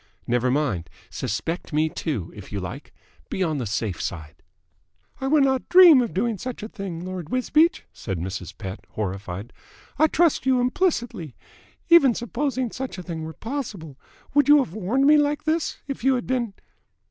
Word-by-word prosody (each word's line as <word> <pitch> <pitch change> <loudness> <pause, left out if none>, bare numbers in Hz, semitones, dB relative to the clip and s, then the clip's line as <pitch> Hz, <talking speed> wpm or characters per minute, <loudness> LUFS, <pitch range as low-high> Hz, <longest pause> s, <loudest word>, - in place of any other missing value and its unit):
Never 125 +1 +1
mind. 125 - 0 0.2
Suspect 135 - -3
me, 155 +1 +3
too, 135 - -4
if 105 -3 -11
you 100 - -3
like. 95 +10 -7 0.4
Be 190 - -1
on 155 -5 -1
the 120 - -3
safe 105 -3 -2
side." 75 -2 -6 0.8
"I 270 - -2
would 290 0 +4
not 265 -1 0
dream 355 -7 +9
of 235 - -2
doing 215 +1 -1
such 255 -4 -6
a - - -4
thing, 180 -5 -6
Lord 185 -4 -6
Wisbeach," 305 - +2
said 95 -5 -5
Mrs. 90 +1 -5
Pett 95 -1 -6
horrified. 100 +1 -5 0.5
"I 315 - +6
trust 320 -4 +2
you 260 -1 +4
implicitly. 245 - -1 0.5
Even 280 -9 +6
supposing 255 0 -2
such 260 -5 -5
a 180 - -6
thing 165 -3 -5
were 160 - -7
possible, 205 - -6 0.3
would 290 -1 +3
you 295 - +9
have 260 - 0
warned 220 +7 +1
me 300 +1 +7
like 295 0 +1
this, 315 +1 -1
if 275 -4 -6
you 265 0 +4
had 245 - -3
been 240 -6 -1
195 Hz, 175 wpm, -24 LUFS, -, 0.8 s, dream